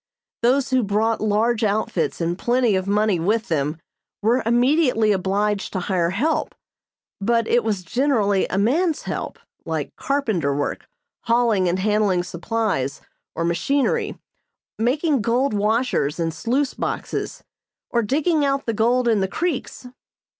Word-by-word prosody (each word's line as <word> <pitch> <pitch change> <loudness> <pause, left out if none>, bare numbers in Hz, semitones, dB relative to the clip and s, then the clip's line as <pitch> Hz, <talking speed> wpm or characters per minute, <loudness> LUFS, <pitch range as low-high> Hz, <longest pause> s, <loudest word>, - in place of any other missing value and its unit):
Those 260 +3 +2
who 260 -1 +3
brought 220 +2 0
large 215 +2 +1
outfits 200 -7 0
and 170 +1 0
plenty 240 +1 +1
of 190 0 -1
money 205 -2 +2
with 215 +7 0
them 150 -1 0 0.5
were 240 +4 +3
immediately 245 -2 +3
obliged 200 +1 0
to 190 - -1
hire 175 -2 0
help, 280 - -1 0.6
but 230 +2 +1
it 240 - +2
was 210 -4 -1
generally 210 -3 +1
a 185 - -3
man's 305 - +1
help, - - -4 0.3
like - - -4
carpenter 215 - 0
work, 145 - -3 0.4
hauling 230 -6 +2
and 175 - 0
handling 200 -2 +1
supplies 175 - -2 0.3
or 165 - -1
machinery, 265 +12 0 0.6
making 275 +4 +1
gold 240 +4 +1
washers 210 - 0
and 165 -1 -1
sluice 255 - -1
boxes, - - -4 0.5
or 235 - +2
digging 295 +7 +1
out 275 -1 0
the 230 - -1
gold 240 +3 +2
in 225 -3 +3
the 190 - +1
creeks. 310 - -3
220 Hz, 140 wpm, -22 LUFS, 190-250 Hz, 0.6 s, who